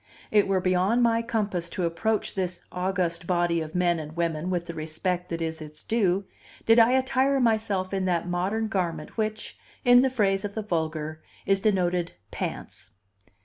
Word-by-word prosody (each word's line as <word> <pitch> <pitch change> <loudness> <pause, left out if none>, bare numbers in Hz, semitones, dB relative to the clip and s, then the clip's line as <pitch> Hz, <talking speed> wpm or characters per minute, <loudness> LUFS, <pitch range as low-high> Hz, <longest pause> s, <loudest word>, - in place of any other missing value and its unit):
It 210 -2 +4
were 195 -1 +2
beyond 185 +6 +2
my 230 -1 +3
compass 205 -7 -2
to 185 -3 -2
approach 215 +6 -1
this 180 -2 -2
august 180 -2 -1
body 175 -2 +1
of 160 +1 -7
men 175 -2 +2
and 155 0 -8
women 170 0 -1
with 175 -2 -1
the 170 - -6
respect 170 +3 -3
that 165 0 -3
is 160 0 -4
its 155 0 -9
due, 200 -4 +1 0.4
did 225 +1 +6
I 230 +2 +6
attire 265 +1 +2
myself 215 -5 +1
in 190 -1 0
that 175 -2 0
modern 190 +6 -1
garment 170 -7 -3
which, 215 -1 -3 0.3
in 245 0 +7
the 265 - +3
phrase 200 -6 +1
of 205 -1 -5
the 220 - -2
vulgar, 160 -4 -3 0.2
is 195 0 +3
denoted 180 -4 +1 0.2
pants. - - -6
185 Hz, 175 wpm, -26 LUFS, 170-215 Hz, 0.4 s, in